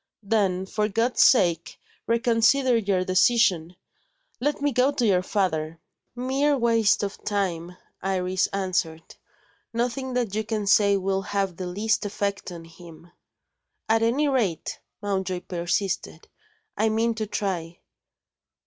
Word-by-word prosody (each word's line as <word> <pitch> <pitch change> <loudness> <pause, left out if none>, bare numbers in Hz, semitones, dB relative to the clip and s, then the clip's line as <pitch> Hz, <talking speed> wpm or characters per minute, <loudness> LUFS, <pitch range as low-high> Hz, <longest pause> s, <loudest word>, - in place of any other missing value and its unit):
"Then, 195 -3 0
for 210 +2 -1
God's 230 +4 +1
sake, 170 -9 +3 0.3
reconsider 235 +3 +3
your 195 -4 0
decision! 185 -3 +2 0.6
Let 290 +4 -1
me 290 0 0
go 255 +2 +2
to 250 -4 -1
your 190 -4 +3
father." 165 -5 -2 0.4
"Mere 270 +4 +1
waste 230 -4 +2
of 200 0 -5
time," 180 -4 -2 0.2
Iris 185 -1 0
answered. 180 -4 -3 0.6
"Nothing 250 +3 -2
that 240 -5 -1
you 215 +1 -1
can 215 -1 -3
say 200 0 +4
will 195 0 -1
have 195 -2 -2
the 185 - -4
least 215 +5 0
effect 200 -1 -3
on 170 -1 -9
him." 170 0 -15 0.8
"At 225 0 +2
any 250 +7 +2
rate," 225 - -1 0.2
Mountjoy 190 -3 -2
persisted, 180 +3 -3 0.5
"I 220 +1 +1
mean 225 +2 +1
to 220 -1 -4
try." 175 -5 -3
200 Hz, 130 wpm, -25 LUFS, 185-230 Hz, 0.8 s, say